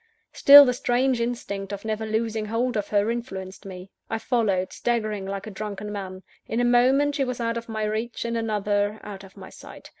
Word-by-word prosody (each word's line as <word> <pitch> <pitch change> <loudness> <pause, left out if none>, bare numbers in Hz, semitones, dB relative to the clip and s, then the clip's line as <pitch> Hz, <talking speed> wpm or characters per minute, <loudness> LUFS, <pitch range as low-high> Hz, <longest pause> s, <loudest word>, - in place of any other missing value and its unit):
Still, 285 0 +9
the 250 - +1
strange 245 0 0
instinct 200 -5 -4
of 200 +1 -6
never 220 0 -3
losing 220 0 -2
hold 235 +3 -1
of 205 -1 -2
her, 205 +2 +1
influenced 195 -6 -6
me. 185 0 -10 0.2
I 225 - -1
followed, 215 -5 0
staggering 215 -5 -2
like 195 +1 -5
a 215 - -7
drunken 210 0 -6
man. 190 -2 -7 0.2
In 225 - -2
a 245 - +2
moment, 260 +4 +3
she 280 - 0
was 250 -2 -4
out 230 0 -1
of 235 0 -6
my 220 -1 -3
reach; 220 +3 -3
in 235 0 -2
another, 210 -2 -1
out 200 -2 -9
of 195 +1 -16
my 190 -1 -11
sight. - - -13
220 Hz, 205 wpm, -24 LUFS, 200-235 Hz, 0.2 s, Still